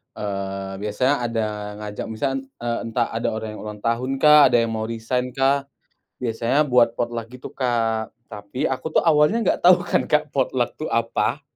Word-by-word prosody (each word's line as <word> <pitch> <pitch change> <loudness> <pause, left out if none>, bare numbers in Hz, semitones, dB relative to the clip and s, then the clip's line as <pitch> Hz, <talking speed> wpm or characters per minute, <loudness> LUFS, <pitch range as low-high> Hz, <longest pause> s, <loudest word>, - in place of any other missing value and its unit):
eee, 100 -1 -4
biasanya 105 +7 +1
ada 115 -2 -1 0.3
ngajak, 105 0 -6
misalnya, 135 +5 -2 0.2
eee, 120 -1 -1
entah 115 +1 0
ada 115 +1 -2
orang 110 0 -5
yang 105 - -9
ulang 105 -1 -8
tahunkah, 135 +5 +5
ada - - +1
yang 115 - -2
mau 110 0 -3
resign-kah, 125 +4 0 0.5
biasanya 120 +5 0
buat 120 -3 +3
potluck, 120 -1 -3
gitu 125 +1 -10
Kak, 115 -3 0 0.2
tapi 105 +3 -5
aku 145 +4 -1
tuh - - +2
awalnya 150 +8 +4
enggak - - +2
tau 180 0 +7
kan, 175 - 0
Kak, 150 -1 +1
potluck, 130 -2 0
itu 155 - -5
apa? 115 0 0
120 Hz, 165 wpm, -22 LUFS, 110-135 Hz, 0.5 s, tau